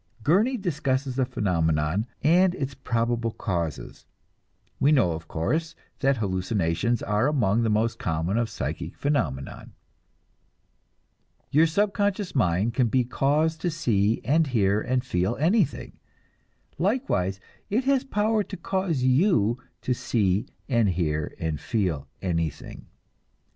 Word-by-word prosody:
Gurney 215 - +3
discusses 140 - -1
the 130 -1 +1
phenomenon 85 0 0 0.2
and 175 +4 +4
its 135 -4 -3
probable 120 -2 -1
causes. 85 - -4 0.7
We 145 - +4
know, 125 - +4
of 80 0 -6
course, 155 - -2 0.2
that 135 -1 +2
hallucinations 95 +2 0
are 105 +5 +1
among 115 -7 +2
the 115 - +1
most 110 +2 0
common 80 +4 -1
of 115 -2 -1
psychic - - -5
phenomenon. 75 - -2 1.8
Your 155 +4 +5
subconscious 200 +2 0
mind 100 -2 +1
can 125 -1 +2
be 125 +3 +2
caused 150 +6 0
to 175 - 0
see 115 -10 +1
and 155 +3 +2
hear 105 -5 +2
and 130 +2 -1
feel 95 0 0
anything; 170 - 0 0.8
likewise 170 - 0 0.3
it 230 +6 +1
has 270 0 +2
power 220 -4 +1
to - - -6
cause 175 -6 -1
you 130 - +3 0.2
to 125 - +1
see 105 -5 0 0.2
and 115 -6 +2
hear 80 -4 -1
and 80 -2 -2
feel 90 - -1 0.2
anything. 85 -4 -3
120 Hz, 125 wpm, -25 LUFS, 95-160 Hz, 1.8 s, Your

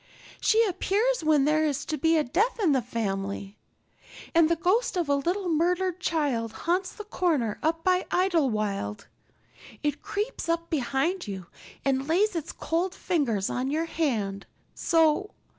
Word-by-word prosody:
She 455 +1 +4
appears 420 +3 0
when 305 -3 +4
there 310 +1 +3
is 295 -2 -1
to 310 - -2
be 325 +3 +3
a 305 - +3
death 420 - 0
in 370 -8 +3
the 265 -2 +3
family. 200 -3 -4 0.7
And 330 -1 +5
the 335 - +3
ghost 370 +6 +1
of 345 -3 0
a - - +4
little 355 +7 -1
murdered 355 +2 +1
child 280 -10 -1
haunts 365 +3 +1
the 425 - -9
corner 320 - 0
up 325 +1 0
by 365 0 +2
Idlewild; 215 - 0 0.8
it 295 -1 -1
creeps 420 -2 -3
up 335 0 -1
behind 285 - 0
you 190 -3 -5 0.4
and 270 0 +1
lays 385 +5 +2
its 330 -1 -3
cold 350 +3 -2
fingers 245 - 0
on 255 +2 -2
your 315 +3 0
hand 220 -13 -2 0.3
so. 325 +4 +2
320 Hz, 155 wpm, -27 LUFS, 265-360 Hz, 0.8 s, And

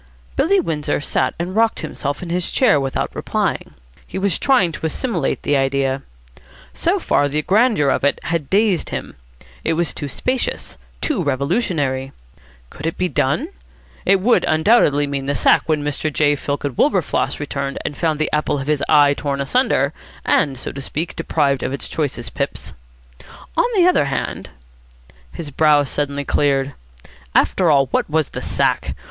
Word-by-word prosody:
Billy 390 +7 +3
Windsor 155 - -1
sat 130 -2 0
and 175 +3 -4
rocked 225 0 +2
himself 145 +4 -4
in 170 - -6
his 180 0 -1
chair 220 - +4
without 135 -1 -2
replying. - - -2 0.3
He - - -6
was 190 -3 0
trying 245 -11 +3
to 160 - -6
assimilate 170 - -2
this 145 - +1
idea. 135 0 +1 0.7
So 65 - +1
far 145 - +1
the 150 +2 -1
grandeur 210 - +3
of - - -1
it 145 - +2
had 160 -4 -2
dazed 200 -3 +2
him. - - -5 0.5
It - - +1
was 170 0 0
too 145 - -4
spacious, 255 - -2 0.3
too 290 - 0
revolutionary. 140 - -1 0.6
Could 155 - -5
it 165 - -3
be 180 0 0
done? 150 - 0 0.5
It 195 0 +4
would 235 +6 +3
undoubtedly 155 -4 +4
mean 140 -1 -3
the 145 - 0
sack - - +4
when 155 -2 +1
Mr. 150 +1 -2
J. 145 0 +2
Fillken 145 -1 -3
Wilberfloss 180 - +1
returned 140 -1 -3
and 145 - -3
found 160 -1 0
the 155 - -1
apple 150 -1 +1
of 135 - -4
his 150 -1 0
eye 145 -2 +6
torn 140 -1 -3
asunder 245 - +1 0.3
and, 135 -3 +2
so - - -5
to 140 - -7
speak, 155 +5 -3
deprived 140 -4 0
of 130 - -2
its 140 - -5
choicest 140 -6 -3
pips. - - -4 0.8
On - - +3
the 360 -3 +5
other 360 - +4
hand... 135 - -3 0.8
His 155 -4 -7
brow 150 0 +4
suddenly 140 0 -2
cleared. 140 -1 +1 0.6
After 180 -3 +3
all, 140 -2 +5
what - - 0
was 155 -1 +1
the - - -6
sack? - - 0
150 Hz, 165 wpm, -20 LUFS, 140-180 Hz, 0.8 s, eye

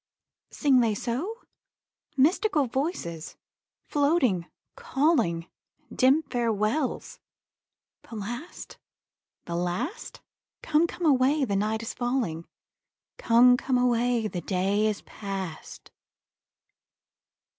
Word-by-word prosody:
Sing 270 -3 +3
they 225 -3 +2
so? 305 - -4 0.7
Mystical 310 +2 +3
voices, 240 - -4 0.5
floating, 280 - +1 0.3
calling; 265 - +1 0.5
Dim 275 +5 +4
farewells 240 +1 -1 0.9
the 230 - -8
last, 240 - -7 0.7
the 170 - -5
last? 180 - -3 0.4
Come, 320 +2 +3
come 350 0 -5
away, 275 0 +3
the 200 -5 -2
night 215 +3 -1
is 230 - -5
falling; 240 -10 -2 0.7
'Come, 245 +1 +5
come 255 0 0
away, 245 -2 +1
the 180 -4 -5
day 195 +4 +1
is 210 -2 -3
past.' 195 -5 -7
245 Hz, 90 wpm, -27 LUFS, 205-285 Hz, 0.9 s, Come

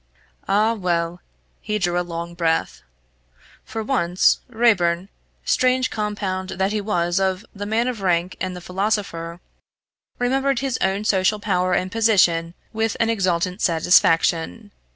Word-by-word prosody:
Ah 215 +3 +3
well 175 -4 -2 0.4
he 210 - -2
drew 175 -3 0
a - - +1
long 170 0 -6
breath. 165 -1 -1 0.8
For 220 0 -5
once, 185 -8 +2
Raeburn, 195 -6 +2 0.4
strange 255 0 +2
compound 200 -3 -3
that 190 +1 +1
he 215 -1 -1
was 175 -3 0
of 190 0 -1
the 205 0 -6
man 225 +3 +1
of 240 -5 -3
rank 180 -1 0
and 185 -1 -3
the 180 - -8
philosopher, 180 -3 -3 0.8
remembered 270 +2 +1
his 265 -1 -2
own 195 +2 0
social 200 +1 +2
power 185 -3 0
and 185 +1 -1
position 180 -7 +2 0.2
with 220 0 -1
an 230 0 +2
exultant 185 -2 -1
satisfaction. 165 - +2
190 Hz, 135 wpm, -22 LUFS, 175-220 Hz, 0.8 s, Ah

